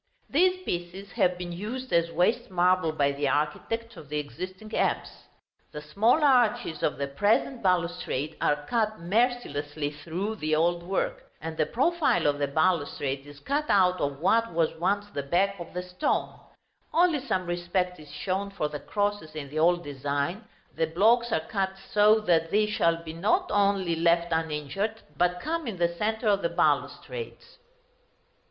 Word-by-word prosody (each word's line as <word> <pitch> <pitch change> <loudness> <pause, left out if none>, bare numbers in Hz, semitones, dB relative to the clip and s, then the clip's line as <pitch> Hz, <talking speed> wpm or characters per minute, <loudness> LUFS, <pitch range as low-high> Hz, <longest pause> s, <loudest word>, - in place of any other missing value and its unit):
These 365 +4 +3
pieces 175 - -5
have 180 0 +1
been 180 -1 -5
used 230 +9 -5
as 170 0 +3
waste 200 +9 +1
marble 180 -2 +2
by 140 -2 +1
the 140 0 -1
architect 155 - -1
of 150 - -12
the 150 - -2
existing 185 +8 -6
apse. - - -1 0.5
The 150 - -6
small 220 - +2
arches 240 - +3
of 150 - 0
the 140 - -1
present 210 - +1
balustrade 170 -5 0
are 145 0 +1
cut 215 -2 0
mercilessly 170 - -1
through 170 +9 -4
the 155 -3 0
old 170 +2 +2
work, - - -3
and 160 0 -5
the 155 -1 +1
profile 330 - +1
of 145 -1 +2
the 145 - +1
balustrade 145 -3 0
is 145 0 -12
cut 290 +3 -1
out 185 -2 +4
of 140 -1 -2
what 230 +7 +2
was 165 -1 +1
once 200 +4 +1
the 140 - -2
back 190 +7 +1
of 170 - -8
the 180 - -2
stone; 180 0 -1 0.6
only 340 -3 +3
some 190 -9 -2
respect 175 +1 -1
is 150 -1 -13
shown 190 +6 -2
for 195 -6 -2
the 150 - -5
crosses 205 -2 -2
in 145 -3 -6
the 155 - -2
old 175 +2 +3
design, 145 - -3 0.3
the 160 - +1
blocks 225 +8 +3
are 160 - +1
cut 190 +2 -2 0.2
so 210 +1 +5
that 165 -5 +2
these 210 +3 +2
shall 165 -4 +1
be 160 -1 -7
not 220 - +1
only 195 -4 +2
left 170 +1 +2
uninjured, 160 +7 -2
but 180 +3 +1
come 320 - -3
in 210 -5 -4
the 170 0 +1
centre 220 +4 -1
of 200 -1 +3
the 170 - 0
balustrades. 465 - -2
180 Hz, 170 wpm, -27 LUFS, 155-215 Hz, 0.6 s, so